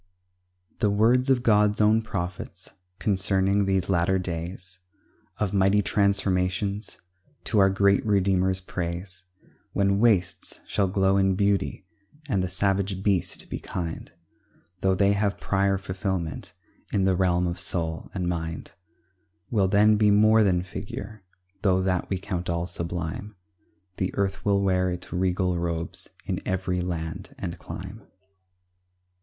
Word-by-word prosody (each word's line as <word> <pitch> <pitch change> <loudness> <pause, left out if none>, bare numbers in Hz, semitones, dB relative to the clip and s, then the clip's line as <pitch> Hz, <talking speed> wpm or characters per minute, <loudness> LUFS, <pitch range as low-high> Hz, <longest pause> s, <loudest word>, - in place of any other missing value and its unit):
The 105 - +3
words 120 +6 +3
of 125 -2 +3
God's 105 -2 +4
own 110 +1 +4
prophets 90 -2 -5 0.3
Concerning 95 0 +2
these 95 -2 +1
latter 95 0 +2
days 90 +1 -5 0.6
Of 105 -2 -1
mighty 100 +1 +3
transformations, 100 0 +1 0.4
To 110 - +1
our 95 0 +6
great 100 0 +3
Redeemer's 95 -2 +2
praise; 90 0 -5 0.5
When 100 0 +2
wastes 100 -7 +1
shall 100 -2 0
glow 95 0 +2
in 95 -1 +3
beauty, 100 -1 0 0.4
And 100 -9 +1
the 90 - -2
savage 95 +1 0
beast 100 -4 0
be - - -5
kind, 85 -2 -5 0.7
Though 95 0 +2
they 100 +1 +3
have 100 0 0
prior 100 0 +1
fulfilment 95 -3 -4 0.4
In 95 -2 +1
the 95 -1 +3
realm 90 -1 +2
of 85 0 -2
soul 80 -2 -1
and 90 -2 -3
mind; 80 -2 -4 0.8
Will 100 -5 +3
then 105 +2 +5
be 105 0 +4
more 110 +2 +5
than 90 -3 +2
figure, 100 +2 -7 0.4
Though 95 -2 +2
that 90 -2 0
we 95 - 0
all 90 -1 -3
count 85 0 -2
sublime; 85 +4 -4 0.6
The 95 - 0
earth 95 -1 -1
will 100 -1 +2
wear 95 -1 +2
its 90 0 -5
regal 90 0 0
robes 85 -1 -3 0.2
In - - -2
every 90 -1 -1
land 80 -3 -5
and - - -5
clime. 95 +5 -8
95 Hz, 135 wpm, -26 LUFS, 90-100 Hz, 0.8 s, our